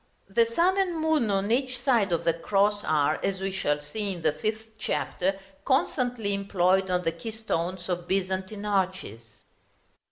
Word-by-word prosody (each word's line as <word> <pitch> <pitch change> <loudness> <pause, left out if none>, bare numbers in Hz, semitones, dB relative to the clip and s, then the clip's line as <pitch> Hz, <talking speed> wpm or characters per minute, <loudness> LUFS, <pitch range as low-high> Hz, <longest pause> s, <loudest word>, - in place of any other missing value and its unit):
The 230 +4 +3
sun 370 +3 +3
and 360 -4 +1
moon 315 -7 +2
on 200 +1 0
each 255 +1 +1
side 235 -7 +2
of 170 - +1
the 165 - +3
cross 205 +4 +1
are, 150 -2 +1
as 195 -1 0
we 195 0 -2
shall 150 -6 0
see 195 +7 -4
in 170 -3 -9
the - - +4
fifth 220 +7 -3
Chapter, 195 -2 -1 0.2
constantly 250 - +1
employed 190 -1 +2
on 180 0 +1
the 165 - +1
keystones 185 -2 -4
of 175 -1 -3
Byzantine 190 +2 -2
arches. 185 - -2
195 Hz, 160 wpm, -27 LUFS, 180-225 Hz, 0.2 s, the